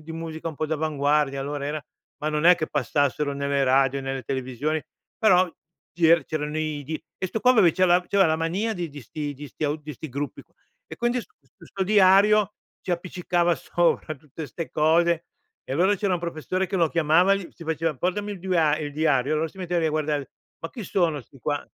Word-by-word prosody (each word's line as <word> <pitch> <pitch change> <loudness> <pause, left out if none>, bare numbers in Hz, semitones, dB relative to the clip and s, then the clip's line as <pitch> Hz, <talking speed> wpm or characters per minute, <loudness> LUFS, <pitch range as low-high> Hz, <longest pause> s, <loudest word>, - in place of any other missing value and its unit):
di 160 +1 -9
musica 165 0 -5
un 155 - -8
po' 155 - -1
d'avanguardia, 150 -2 0
allora 140 +1 -4
era 150 0 -4 0.3
ma 155 - -2
non 150 +2 +1
è 180 - +9
che 155 - -2
passassero 145 0 0
nelle 140 0 0
radio, 135 +1 +3
nelle 135 0 -4
televisioni, 130 +5 -2 0.4
però 185 -4 +5 0.5
ci 170 -2 +2
er 170 0 +5
c'erano 150 0 -3
i 155 -2 -2
di 155 +2 -5 0.2
e 185 - -1
'sto 220 +4 -4
qua 250 - +5
aveva 215 -7 +5
c'aveva 180 +1 +4
c'aveva 195 -2 +4
la 160 - +2
mania 180 +8 -1
di 175 -3 -3
di 145 0 -9
sti 145 +3 -5
di 145 +2 -9
sti 155 - -5
au 145 +1 0
di 150 -1 -9
sti 155 +5 -8
gruppi 140 +3 -5
q - - -40 0.4
e - - -9
quindi 240 +1 0 0.4
questo 195 - -5
diario 205 +1 +5 0.3
ci - - -5
appiccicava 175 0 0
sopra 170 -2 0
tutte 150 +2 -9
'ste 165 +3 -6
cose 165 +2 +2 0.4
e - - -6
allora 185 +8 +3
c'era 200 0 0
un 175 - -3
professore 170 +3 -2
che 195 - -1
lo 170 -3 +3
chiamava 170 +4 +4
e - - -1
gli 180 -4 -9
si 170 - -12
faceva: 160 0 -1
"Portami 205 +7 -2
il 200 - -8
duari 160 -4 +1
il 145 - -5
diario", 145 -2 +1
allora 160 +1 0
si 190 - -21
metteva 180 -2 -1
lì 160 - +1
a - - +1
guardare, 150 -2 -1 0.3
"Ma 165 - -6
chi 235 - -7
sono 170 -6 0
'sti 135 +2 -18
qua?" 145 +2 -2
160 Hz, 215 wpm, -25 LUFS, 145-180 Hz, 0.5 s, è